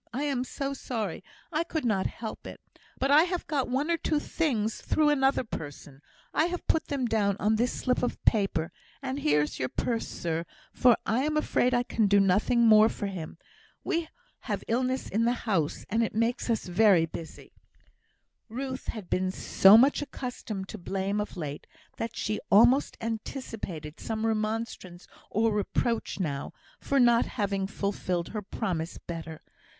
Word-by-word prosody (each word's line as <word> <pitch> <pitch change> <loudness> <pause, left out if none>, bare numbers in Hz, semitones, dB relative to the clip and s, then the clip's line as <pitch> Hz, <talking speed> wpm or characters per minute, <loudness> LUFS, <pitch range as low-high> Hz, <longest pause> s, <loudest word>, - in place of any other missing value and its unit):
I 270 +5 -2
am 275 -4 0
so 275 +1 -4
sorry 220 -10 -4 0.3
I 320 +1 +1
could 320 -4 -3
not 200 -5 +1
help 225 -2 -7
it. - - -9 0.4
But 270 +1 +1
I 295 +2 +8
have 360 -1 -3
got 275 -5 -1
one 280 +6 0
or 335 - +2
two 305 -2 0
things 235 -10 -1
through 305 -1 +2
another 270 -2 +2
person. 145 - -8 0.3
I 315 - +3
have 350 0 -4
put 320 - +1
them 275 -3 -1
down 205 -4 +1
on 215 +1 +2
this 240 +3 +1
slip 250 -1 0
of 245 - -2
paper; 195 -7 +2 0.3
and 265 +1 -3
here 150 - +3
is 150 - -5
your 130 - -1
purse, 230 -2 -2
sir, 165 0 -3 0.3
for 245 -2 +5
I 230 +3 +1
am 305 +1 0
afraid 250 -4 +2
I 245 - +2
can 225 -3 +1
do 200 0 +5
nothing 200 +5 +3
more 215 0 +7
for 205 - -5
him. 175 -5 -6 0.5
We 335 -3 -1 0.3
have - - -4
illness 255 +3 0
in 225 +3 +1
the 240 - +3
house, 170 -9 0
and 225 +3 +1
it 225 - -1
makes 230 +2 0
us 225 -2 0
very 180 -2 +4
busy." 165 0 -9 1.0
Ruth 260 +3 -5
had 215 -6 -5
been 185 +1 0
so 195 +2 +6
much 275 +5 +4
accustomed 235 -8 -5
to 215 - -7
blame 195 +3 -1
of 210 - -6
late, 150 -3 -5 0.3
that 230 0 -4
she 215 0 -1
almost 240 +7 +5
anticipated 220 - -5
some 220 0 -3
remonstrance 215 -5 -3 0.2
or 225 +1 +2
reproach 210 +2 -1
now, 145 -6 -3 0.3
for 280 - +1
not 240 -2 +5
having 200 -2 -1
fulfilled 195 -3 -2
her 215 - -4
promise 175 -4 -3
better. 165 -2 -7
220 Hz, 170 wpm, -28 LUFS, 190-255 Hz, 1.0 s, I